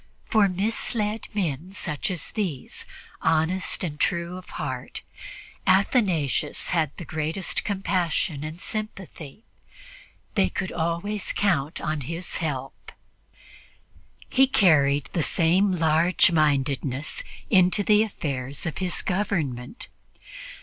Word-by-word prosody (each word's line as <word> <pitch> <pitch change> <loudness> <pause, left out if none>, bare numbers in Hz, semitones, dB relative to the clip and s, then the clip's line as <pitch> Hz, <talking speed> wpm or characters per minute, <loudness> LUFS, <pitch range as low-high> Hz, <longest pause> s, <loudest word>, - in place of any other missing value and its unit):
For 210 -3 +4
misled 210 +2 -1
men 180 -3 -2
such 160 -3 -3
as 180 -5 -4
these, 175 -12 -4 0.3
honest 165 +5 +1
and 150 -4 -4
true 170 -1 0
of 185 0 -10
heart, - - -5 0.6
Athanasius 185 - +2
had 160 -4 +2
the 175 - -7
greatest 160 +5 -1
compassion 180 -6 0
and 155 +2 -6
sympathy; 195 - -5 0.9
they 195 - +3
could 185 - -3
always 170 +5 -2
count 165 -6 +1
on 155 -2 -2
his 165 +6 -4
help. 135 -5 -4 1.4
He 265 +1 +5
carried 145 - +4
the 170 - +1
same 175 +6 +3
large 165 +1 +4
mindedness 145 - +1 0.3
into 185 0 +5
the 210 +1 +5
affairs 140 -10 -3
of 160 - -3
his 185 -2 0
government. 170 - -2
170 Hz, 110 wpm, -25 LUFS, 150-195 Hz, 1.4 s, He